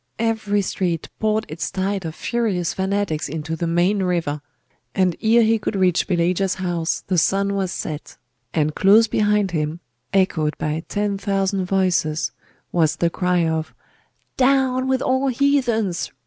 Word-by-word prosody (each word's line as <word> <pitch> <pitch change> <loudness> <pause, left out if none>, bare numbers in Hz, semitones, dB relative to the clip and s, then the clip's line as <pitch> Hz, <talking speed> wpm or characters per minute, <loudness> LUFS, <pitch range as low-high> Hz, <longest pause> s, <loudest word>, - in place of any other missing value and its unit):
Every 220 -3 0
street 175 -4 -2
poured 215 0 +1
its 155 +2 -4
tide 190 0 -2
of 160 0 -5
furious 210 -8 -1
fanatics 190 -6 -1
into 160 +2 -4
the 170 +1 -2
main 175 +4 +2
river; 170 -5 -1 0.5
and 185 -3 +2
ere 230 +1 +5
he 225 0 +3
could 210 - -3
reach 185 -3 +2
Pelagia's 180 +1 +1
house 175 -3 -1
the 185 -2 +2
sun 200 +4 +1
was 190 -2 -1
set, 155 -4 -6 0.3
and 155 -1 0
close 210 +6 +5
behind 210 -2 +1
him, 155 0 -2 0.3
echoed 165 -6 +1
by 155 +1 -2
ten 205 -1 -1
thousand 195 -1 0
voices, 180 -5 +1 0.4
was 160 -2 +2
the 170 +1 0
cry 180 -1 +1
of 160 -1 -2 0.6
'Down 260 -1 +2
with 265 -1 +1
all 260 +1 +1
heathens! 240 -8 +1
190 Hz, 150 wpm, -21 LUFS, 170-210 Hz, 0.6 s, ere